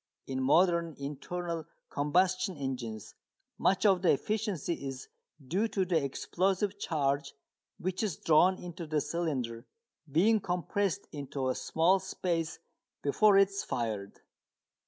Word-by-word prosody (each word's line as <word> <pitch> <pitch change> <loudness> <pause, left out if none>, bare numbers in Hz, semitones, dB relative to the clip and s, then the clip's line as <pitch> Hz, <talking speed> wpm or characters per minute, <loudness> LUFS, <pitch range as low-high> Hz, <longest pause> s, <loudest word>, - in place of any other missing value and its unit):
In 130 -1 -3
modern 170 +3 +3
internal 160 +4 -4 0.2
combustion 180 +6 +1
engines 125 -6 -5 0.5
much 195 +3 +2
of 190 -3 +5
the 180 - +3
efficiency 185 - -1
is 130 -1 -6 0.4
due 195 - +1
to 195 -4 0
the 170 -4 +1
explosive 190 +8 -1
charge 140 -5 -1 0.4
which 185 +1 -2
is 205 -8 -1
drawn 175 +4 +4
into 175 -1 -7
the 155 0 +1
cylinder 135 -8 -3 0.4
being 210 +9 +4
compressed 180 +1 -1
into 140 -2 -3
a - - +2
small 175 +8 +2
space 175 -3 -2 0.5
before 195 +8 +5
it 195 0 +6
is 200 0 -4
fired. 110 -6 -3
170 Hz, 125 wpm, -31 LUFS, 140-190 Hz, 0.5 s, it